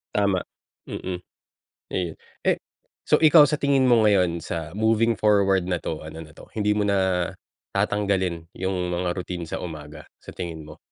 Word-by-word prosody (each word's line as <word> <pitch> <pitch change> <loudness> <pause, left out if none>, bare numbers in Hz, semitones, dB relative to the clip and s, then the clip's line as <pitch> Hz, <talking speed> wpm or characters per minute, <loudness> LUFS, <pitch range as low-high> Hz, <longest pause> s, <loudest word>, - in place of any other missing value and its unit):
Tama, 100 -3 +2 0.5
mm, 90 -1 -4 0.7
ayun. 85 -3 -2 0.3
Eh, - - +4 0.5
so, - - +3
ikaw 155 0 +8
sa 145 +1 +1
tingin 140 -2 +3
mo 115 -2 +5
ngayon, 90 -5 +3
sa, 80 -1 -5
moving 110 +1 +2
forward 100 -3 +3
na 90 -2 0
'to, 80 - -4
ano 80 +1 -8
na 80 - -15
'to, - - -14
hindi 105 -1 +1
mo 105 0 +1
na, 95 -3 +1 0.4
tatanggalin 95 -5 0
yung 90 -1 -1
mga 90 0 -1
routine 90 -2 -5
sa 80 - -5
umaga, 75 -3 -8 0.2
sa - - -12
tingin 85 -4 -6
mo? 75 - -12
95 Hz, 165 wpm, -24 LUFS, 85-105 Hz, 0.7 s, ikaw